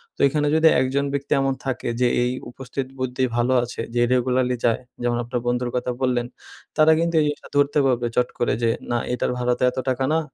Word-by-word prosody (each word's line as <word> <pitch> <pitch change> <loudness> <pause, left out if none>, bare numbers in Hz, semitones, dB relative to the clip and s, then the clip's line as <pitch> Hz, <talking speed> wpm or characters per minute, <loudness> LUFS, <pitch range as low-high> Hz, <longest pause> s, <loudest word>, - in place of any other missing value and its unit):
তো - - -32
এখানে 150 +1 0
যদি 160 0 +5
একজন 135 +2 0
ব্যক্তি 140 0 -1
এমন 135 0 +1
থাকে 130 -2 -2
যে 125 - +5 0.2
এই 125 - 0 0.2
উপস্থিত 130 +1 -5
বুদ্ধি 130 0 -1
ভালো 120 +2 +2
আছে 120 -1 -5
যে 120 - +3
রেগুলারলি 125 0 +1
যায় 115 +1 +2 0.2
যেমন 120 -1 +1
আপনার 120 +1 -3
বন্ধুর 125 0 0
কথা 125 0 -1
বললেন। 125 -2 +1 0.5
তারা 155 0 +6
কিন্তু 170 0 0
এই - - +4
জিনিসটা 145 - -5
ধরতে 145 +1 +3
পারবে 125 -2 +1
চট 125 0 +2
করে 120 - +1
যে 115 - +3 0.2
না 120 - +2 0.2
এটার 125 - -1
ভাড়াতে 125 0 0
এতো 130 +1 -3
টাকা 130 +1 0
না। 160 - +3
125 Hz, 210 wpm, -23 LUFS, 125-135 Hz, 0.5 s, তারা